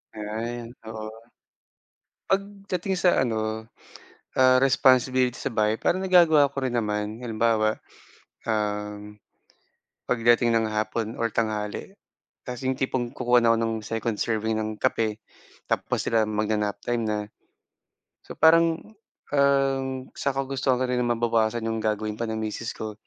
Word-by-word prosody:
Ay, 115 +3 -5 0.2
oo. 110 -1 -6 1.2
Pagdating 195 -1 -2
sa 180 -6 +4
ano, 110 -2 -2 0.7
ah, 130 0 +5
responsibility 130 -1 +3
sa 140 - -3
bahay 110 0 +2
parang 185 +2 0
nagagawa 165 -6 +5
ko 140 - -8
rin 120 - -3
naman 105 0 -2
halimbawa, 110 -2 +1 0.7
um, 105 -1 -3 0.9
pagdating 120 0 +3
ng 115 -1 +2
hapon 110 +1 -2
or 115 0 -1
tanghali 110 - -3 0.5
'tas 125 -1 -6
'yong 130 0 0
tipong 130 -2 -1
kukuha 125 -1 +3
na 115 - +5
ako - - 0
ng 115 0 0
second 115 0 -2
serving 110 -1 -1
ng 110 0 -2
kape 110 -1 0 0.5
tapos - - -1
sila 115 -1 +3
magna-nap 105 -1 -1
time 120 -1 0
na. 105 0 0 1.1
So - - -9
parang, 165 +5 +4 0.4
um, 135 -2 +2
sa 140 - -1
kagustuhan 135 -1 0
ko - - +2
rin 125 0 0
na 120 - 0
mabawasan 115 -1 +1
'yong 110 0 -1
gagawin 110 0 -1
pa 115 - -1
ng 110 - -2
misis 110 +2 -4
ko, 110 -1 -5
115 Hz, 135 wpm, -25 LUFS, 110-130 Hz, 1.2 s, ah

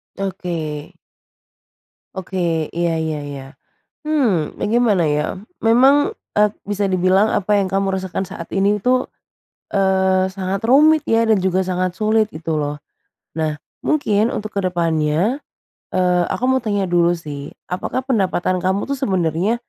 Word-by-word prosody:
Oke. 170 -4 -4 1.2
Oke. 170 -4 -2
Iya 170 -1 0
iya 155 -1 -2
iya. 140 -2 -7 0.6
Hmm, 235 - +1
nah - - -2
gimana 225 -6 +3
ya? 150 0 +1 0.3
Memang, 270 - +4 0.2
e - - +5 0.2
bisa 205 -1 -1
dibilang 185 +2 +3
apa 205 +1 +2
yang 195 - 0
kamu 195 0 0
rasakan 190 0 -3
saat 170 -3 -8
ini 200 +2 +2
itu, 255 +4 +2 0.7
eee, 190 -1 +2
sangat 190 0 -3
rumit 305 +4 +5
ya 230 0 +3
dan 220 -3 +4
juga 190 0 +1
sangat 185 0 -2
sulit 215 0 +2
gitu 160 0 -3
loh. 145 0 -3 0.6
Nah, 155 -2 -2 0.2
mungkin 230 -6 +1
untuk 215 0 -5
ke 200 - +1
depannya 170 - 0 0.5
eee, 180 -1 +2
aku 245 - -3
mau 260 0 +2
tanya 205 -3 0
dulu 175 0 +3
sih, 145 -3 -7 0.2
apakah 185 +7 -3
pendapatan 185 -6 0
kamu 190 +2 0
itu 280 - 0
sebenernya 190 - 0
190 Hz, 140 wpm, -19 LUFS, 170-215 Hz, 1.2 s, e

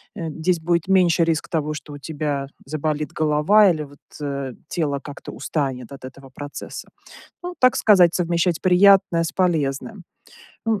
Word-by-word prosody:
э, 165 -2 -4
здесь 165 +3 -1
будет 170 +1 0
меньше 180 -3 +4
риск 165 -1 -1
того, 155 -2 -1
что 150 -1 -9
у - - -8
тебя 145 -2 -3 0.2
заболит 150 +1 -3
голова 155 +7 +4
или, 155 -3 -3
вот, 145 -1 -14 0.2
э, 140 -2 -4 0.2
тело 145 -4 -1
как-то 145 - -9
устанет 135 -5 -3
от 135 -2 -10
этого 135 +1 -12
процесса. 145 +1 -8 0.5
Ну, 355 0 -6
так 255 0 +5
сказать, 180 -5 +5
совмещать 170 -1 0
приятное 185 -2 +5
с 165 - -3
полезным. 175 +2 -1 0.6
Ну, 225 - +2
м - - -8
160 Hz, 160 wpm, -22 LUFS, 145-180 Hz, 0.6 s, так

